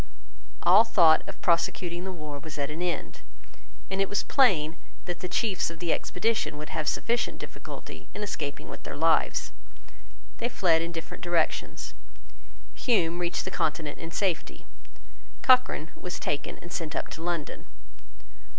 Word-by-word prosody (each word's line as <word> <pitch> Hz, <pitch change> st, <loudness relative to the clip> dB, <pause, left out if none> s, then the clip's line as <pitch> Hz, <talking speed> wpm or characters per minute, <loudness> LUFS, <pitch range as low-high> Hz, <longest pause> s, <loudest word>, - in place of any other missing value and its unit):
All 195 Hz, +5 st, +8 dB
thought 170 Hz, -8 st, +6 dB
of -, -, -9 dB
prosecuting 175 Hz, +1 st, +1 dB
the 190 Hz, -, -3 dB
war 155 Hz, -5 st, -6 dB
was 155 Hz, +2 st, -8 dB
at 140 Hz, 0 st, -1 dB
an 160 Hz, +3 st, -5 dB
end: 180 Hz, -1 st, -2 dB, 0.7 s
and 190 Hz, 0 st, +1 dB
it 195 Hz, -, +1 dB
was 205 Hz, -, +1 dB
plain 170 Hz, -, +4 dB, 0.3 s
that 175 Hz, -2 st, -4 dB
the 180 Hz, -, -4 dB
chiefs 200 Hz, -8 st, +1 dB
of 165 Hz, -, -8 dB
the 170 Hz, 0 st, +1 dB
expedition 180 Hz, -6 st, 0 dB
would 150 Hz, 0 st, -6 dB
have 155 Hz, -, -2 dB
sufficient 235 Hz, +1 st, 0 dB
difficulty -, -, -9 dB
in 210 Hz, -, -5 dB
escaping 145 Hz, -8 st, -4 dB
with -, -, -8 dB
their -, -, -6 dB
lives. 165 Hz, +2 st, +2 dB, 0.9 s
They 240 Hz, -, 0 dB
fled 170 Hz, -8 st, +3 dB
in 170 Hz, +1 st, -2 dB
different 165 Hz, +1 st, -7 dB
directions. 170 Hz, -, 0 dB, 0.8 s
Hume 175 Hz, -8 st, +2 dB
reached 175 Hz, 0 st, -1 dB
the 190 Hz, -, -3 dB
Continent 155 Hz, -4 st, -1 dB
in 165 Hz, -, -6 dB
safety. 180 Hz, 0 st, -1 dB, 0.8 s
Cochrane 255 Hz, -, +4 dB
was 180 Hz, -, -5 dB
taken 145 Hz, -, -2 dB
and 175 Hz, -, -10 dB
sent 160 Hz, -5 st, -3 dB
up -, -, -2 dB
to 160 Hz, -, -7 dB
London. 170 Hz, -3 st, -3 dB
170 Hz, 155 wpm, -28 LUFS, 160-190 Hz, 0.9 s, All